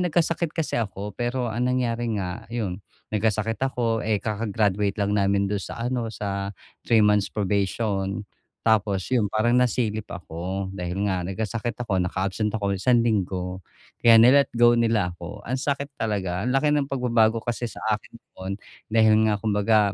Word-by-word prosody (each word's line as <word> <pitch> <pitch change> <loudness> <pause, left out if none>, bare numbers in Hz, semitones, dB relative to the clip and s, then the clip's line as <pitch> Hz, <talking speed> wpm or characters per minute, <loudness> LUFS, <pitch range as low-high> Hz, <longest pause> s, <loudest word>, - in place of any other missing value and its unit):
nagkasakit 170 -1 +1
kasi 160 -7 0
ako, 105 -1 -4
pero 120 +2 -2
ang 120 +3 0
nangyari 120 -2 0
nga, 90 -2 -5
yun 105 -5 -3 0.3
nagkasakit 110 +1 0
ako, 120 -4 0
eh, 110 -1 +1
kaka-graduate 105 -1 0
lang 100 -1 0
namin 100 -1 +2
do'n 100 0 -1
sa - - -7
ano, 120 -2 -1
sa 100 -3 -3 0.3
3 110 -2 +3
months 105 -1 +3
probation. 100 0 -1 0.4
Tapos 100 -4 +2
yun, 115 -5 +3
parang 110 +3 +1
nasilip 110 -4 0
ako 95 +3 -5
dahil 90 +1 -3
nga 95 -3 0
nagkasakit 110 +5 -3
ako, 95 -5 0
naka-absent 95 +3 -1
ako 100 -2 -1
ng 100 - -2
isang 120 +1 +4
linggo, 95 -4 -1 0.4
kaya 115 -1 +7
ni-let 130 +5 +6
go 120 0 +6
nila 115 -6 +2
ako. 90 +4 -9
Ang 130 +2 -2
sakit 140 +1 -2
talaga. 95 -5 -1
Ang 125 - 0
laki 150 +2 +3
ng 145 -2 +1
pagbabago 115 -4 +2
kasi 120 0 -2
sa - - -10
akin 105 +2 -5
noon, 95 -4 -8 0.4
dahil 110 -1 +5
nga 105 - +2
kumbaga 105 +1 +2
110 Hz, 165 wpm, -25 LUFS, 100-120 Hz, 0.4 s, kaya